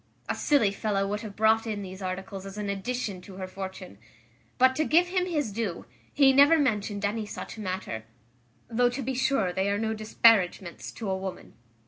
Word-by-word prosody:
A - - 0
silly 275 -9 +2
fellow 200 -1 -1
would 210 +1 -2
have 210 -3 -8
brought 220 +1 +3
in 210 -2 -3
these 190 +1 -9
articles 190 +1 -5
as 195 +1 -9
an 205 -1 -2
addition 200 -1 -3
to 190 +1 -12
her 190 0 -5
fortune; 190 0 -8 0.6
but, 260 +1 +5
to 310 - +3
give 345 +3 +3
him 365 0 0
his 295 - -1
due, 205 -4 -3 0.3
he 275 -2 +5
never 285 +4 +7
mentioned 210 -7 0
any 210 +1 -2
such 220 - -7
matter; 185 - -4 0.6
though 245 +1 +2
to 255 +3 -4
be 265 +3 -2
sure 255 -8 +1
they 190 +2 0
are 200 - +1
no 220 +1 -1
disparagements 215 -5 +2
to 220 - -6
a 190 - 0
woman." 190 -1 -6
210 Hz, 190 wpm, -27 LUFS, 195-245 Hz, 0.6 s, never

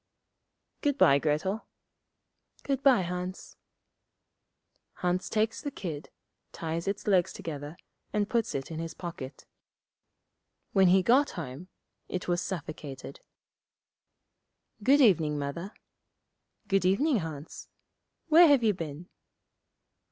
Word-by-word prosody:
'Good 285 -1 +1
bye, 140 - +6
Grettel.' 160 +9 -1 1.0
'Good 275 -1 -1
bye, 260 -9 +5
Hans.' 180 +1 -5 1.4
Hans 180 +1 -1
takes 220 +1 0
the 290 - -3
kid, 170 - -6 0.4
ties 165 +2 -4
its 200 0 -2
legs 190 -3 +3
together, 150 0 -7 0.3
and 210 -1 0
puts 230 0 0
it 135 +3 -4
in 160 - -4
his 165 -1 -5
pocket. 150 -7 -8 1.3
When 190 -1 +5
he 185 +1 +5
got 265 +8 +4
home, 155 +2 -6 0.4
it 185 - -4
was 175 0 +1
suffocated. 145 -7 -6 1.6
'Good 275 +7 +5
evening, 160 - +4
Mother.' 145 +7 -4 1.0
'Good 195 -1 +2
evening, 245 - +3
Hans. 160 -4 -6 0.6
Where 335 +2 +8
have 280 -5 +5
you 215 -2 +4
been?' 165 -1 -7
180 Hz, 110 wpm, -29 LUFS, 155-215 Hz, 1.6 s, Where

